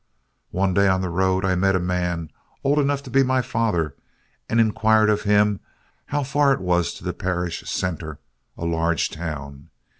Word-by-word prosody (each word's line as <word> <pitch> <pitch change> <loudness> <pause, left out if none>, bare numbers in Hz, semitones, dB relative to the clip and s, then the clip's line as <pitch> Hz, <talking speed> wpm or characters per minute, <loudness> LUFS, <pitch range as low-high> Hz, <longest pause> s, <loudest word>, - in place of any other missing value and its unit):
One 95 0 0
day 100 +2 +4
on 95 0 +2
the 90 -2 -3
road, 95 +1 +1
I 95 - +2
met 95 +1 +2
a - - +2
man, 90 -3 -2 0.3
old 145 +2 +3
enough 140 -1 0
to 130 - -10
be 135 - +4
my 130 -1 +2
father, 105 - -1 0.5
and 115 - +2
inquired 110 -1 +4
of 105 - 0
him 105 -1 +3 0.5
how 145 0 -1
far 140 +1 +2
it - - -2
was 90 -2 +1
to - - -12
the - - -2
parish 90 -2 -3
centre, 80 -4 -3 0.4
a 85 - -4
large 85 -1 0
town. 70 -4 -7
95 Hz, 180 wpm, -23 LUFS, 85-110 Hz, 0.5 s, day